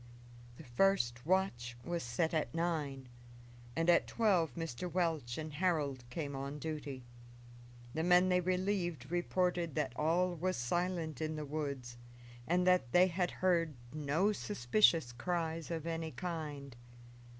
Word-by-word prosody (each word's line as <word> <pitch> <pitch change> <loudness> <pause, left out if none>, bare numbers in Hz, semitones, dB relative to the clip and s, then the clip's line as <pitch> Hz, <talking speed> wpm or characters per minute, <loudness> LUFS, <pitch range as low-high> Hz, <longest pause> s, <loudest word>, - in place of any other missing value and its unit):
The - - -10
first 120 -3 +1
watch 120 -11 0
was 170 0 -2
set 120 +8 -1
at 160 0 -1
nine, 150 -6 -1 0.7
and 165 +1 0
at 175 -1 +5
twelve 195 -8 +2
Mr. 165 +1 -4
Welch 160 -9 0
and 155 -1 -5
Harold 145 -6 0
came 140 +1 -4
on 140 +2 -4
duty. 145 -4 -5 0.9
The 160 - -1
men 180 +2 +5
they 180 0 +3
relieved 180 -4 -1
reported 175 -2 0
that 130 - -1
all 175 +5 +2
was 185 +3 -1
silent 165 +3 -1
in 155 0 -2
the 155 -1 -4
woods, 140 -5 -4 0.5
and 180 +2 +2
that 180 -9 +3
they 180 +1 +7
had 180 0 0
heard 170 -5 +1 0.2
no 155 +7 +1
suspicious 120 - +3
cries 165 +5 -2
of 165 -2 -3
any 165 -1 -2
kind. 150 -6 -5
160 Hz, 140 wpm, -35 LUFS, 140-180 Hz, 0.9 s, they